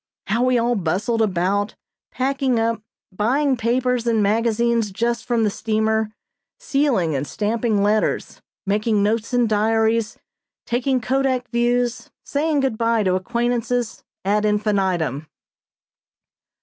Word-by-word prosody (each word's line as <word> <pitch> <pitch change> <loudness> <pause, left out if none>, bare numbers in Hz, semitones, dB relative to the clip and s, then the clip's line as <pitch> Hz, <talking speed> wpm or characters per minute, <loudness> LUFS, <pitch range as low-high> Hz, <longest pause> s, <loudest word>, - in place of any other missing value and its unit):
How 225 +4 0
we 255 0 +3
all 240 +1 +1
bustled 205 +4 0
about, 200 +1 0 0.4
packing 265 -2 0
up, 225 -1 0 0.3
buying 265 +7 +2
papers 245 +1 0
and 225 -2 +2
magazines 230 +1 +1
just 235 +4 -2
from 235 -2 +1
the 210 - +1
steamer, 220 0 0 0.5
sealing 275 - +1
and 135 +2 -2
stamping 215 -1 0
letters, 210 +1 0 0.2
making 210 +1 +1
notes 220 +3 0
in 245 -1 +3
diaries, 220 +1 +1 0.5
taking 255 +2 0
kodak 260 0 0
views, 240 0 0
saying 295 0 0
good 260 -5 -1
bye 230 -1 +2
to 185 -2 +1
acquaintances, 240 +3 -1 0.2
ad 210 +2 +2
infinitum. 190 - 0
230 Hz, 120 wpm, -21 LUFS, 210-245 Hz, 0.5 s, we